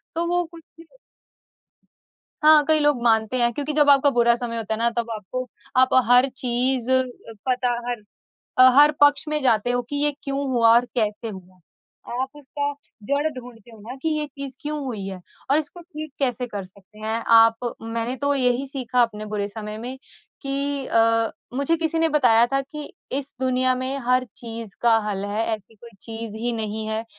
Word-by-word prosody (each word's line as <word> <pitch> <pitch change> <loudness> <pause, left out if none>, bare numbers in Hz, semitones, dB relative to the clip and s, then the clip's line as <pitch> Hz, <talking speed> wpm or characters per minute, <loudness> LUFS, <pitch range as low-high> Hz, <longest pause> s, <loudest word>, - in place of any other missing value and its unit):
तो 335 +1 0
वो 355 +1 +1
कुछ 330 0 -14 1.8
हाँ, 305 -1 +7
कई 315 -1 +6
लोग 295 -4 +2
मानते 225 +1 +2
हैं 235 0 +3
क्योंकि 290 +4 -3
जब 295 -1 +4
आपका 280 0 +6
बुरा 235 0 +5
समय 235 -1 -4
होता 220 -1 -2
है - - -2
ना, 235 +1 +3
तब 235 0 -1
आपको 225 +4 -5 0.3
आप 260 - +4 0.2
हर 250 +2 +6
चीज़ 250 0 0
अ, 260 0 +4 0.5
पता 250 -1 +1 0.2
हर 240 -3 -4 0.7
हर 295 +1 +8
पक्ष 290 +1 +4
में 305 0 0
जाते 245 -2 +3
हो 245 0 0
कि 290 - -3
ये 295 +1 +3
क्यों 275 0 -2
हुआ 230 -2 +5
और 240 +1 +4
कैसे 220 0 -1
हुआ? 185 -2 -12 0.5
आप 255 +2 -2
उसका 285 0 -4 0.3
जड़ 285 +2 +1
ढूँढते 240 -3 -12
हो 225 - -14
ना 230 +5 -9
कि 320 - 0
ये 305 -1 0
चीज़ 275 -1 -8
क्यों 300 0 -3
हुई 220 -7 -5
है? 190 -1 -6 0.3
और 285 - +5
इसको 315 +3 -5
ठीक 310 -3 -9
कैसे 250 -2 -1
कर 205 -4 -5
सकते 195 +3 -17
हैं, 220 +1 -2
आप 230 +1 +4
मैंने 230 +2 -3
तो 285 +1 0
यही 250 0 +1
सीखा 255 -2 0
अपने 215 -3 -1
बुरे 210 -1 -3
समय 210 0 -7
में 250 +4 -6 0.4
कि 275 0 0
अ, 230 0 +2 0.3
मुझे 280 +4 +1
किसी 325 0 0
ने 325 0 +4
बताया 245 -6 +4
था 275 - +2
कि 295 +2 -8 0.3
इस 280 0 -9
दुनिया 255 0 +2
में 260 +2 -2
हर 255 0 +3
चीज़ 230 -3 -8
का 235 -1 +5
हल 200 -1 -3
है, 210 +2 -2
ऐसी 215 +1 -20
कोई 230 +2 -15
चीज़ 225 -1 -7
ही 240 +2 -2
नहीं 220 -1 -4
है 220 +1 -2
245 Hz, 190 wpm, -23 LUFS, 225-280 Hz, 1.8 s, हर